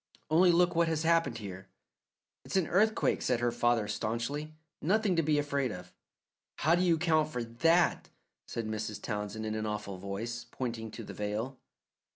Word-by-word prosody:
"Only 175 +3 +6
look 175 +1 +4
what 170 0 +3
has 160 -1 0
happened 165 -7 +2
here." 95 -3 -8 0.8
"It's - - -6
an 190 -3 +3
earthquake," 215 +6 +2
said 125 -2 +1
her 120 0 +1
father 120 -3 +2
staunchly; 120 +9 -3 0.3
"nothing 200 +3 +2
to 165 - +3
be 150 -1 +2
afraid 140 -3 0
of." 90 -1 -9 0.6
"How 160 - +2
do 175 - +3
you 175 -2 +4
account 160 -2 +2
for 125 -5 -3
THAT?" 165 +10 +2 0.4
said 115 - -4
Mrs. 110 -1 -3
Townsend 105 0 -4
in 110 - -2
an 110 0 -2
awful 105 -3 -4
voice, 115 +5 -5
pointing 115 -3 -4
to 115 - -8
the - - -8
veil. 110 +5 -3
120 Hz, 175 wpm, -31 LUFS, 110-165 Hz, 0.8 s, Only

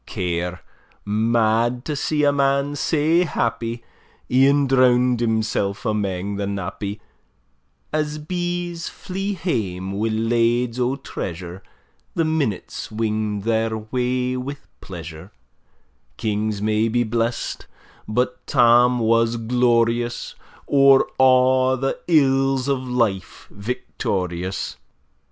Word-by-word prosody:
Care, 90 0 -3 0.4
mad 115 +3 +1
to 150 - -2
see 150 +1 0
a 145 - +5
man 140 0 +1
sae 155 +3 +2
happy, 115 -6 -2 0.5
E'en 140 +3 +4
drown'd 125 -2 +3
himself 110 -3 -1
amang 100 -2 -2
the 100 -1 -2
nappy, 100 +1 -4 0.9
As 150 -1 -1
bees 175 +1 -3
flee 195 +2 -4
hame 95 - -2
wi' 105 +3 -1
lades 115 +2 +1
o' 125 +2 +1
treasure, 90 - -6 0.5
The 165 - +1
minutes 145 - -2
wing'd 110 -2 -2
their 110 0 0
way 125 +3 -1
wi' 140 +3 -5 0.2
pleasure: 85 0 -9 0.9
Kings 105 -1 -2
may 110 +1 +2
be 120 +2 +1
blest, 115 +1 -2 0.4
but 125 +3 -1
Tam 125 -1 +5
was 115 0 +2
glorious, 120 0 +1 0.3
O'er 135 -1 +6 0.2
a' 130 0 +4
the 135 +1 -1
ills 135 -4 +3
o' 140 - +3
life 120 -7 -2
victorious! 95 -4 -3
120 Hz, 105 wpm, -22 LUFS, 105-135 Hz, 0.9 s, O'er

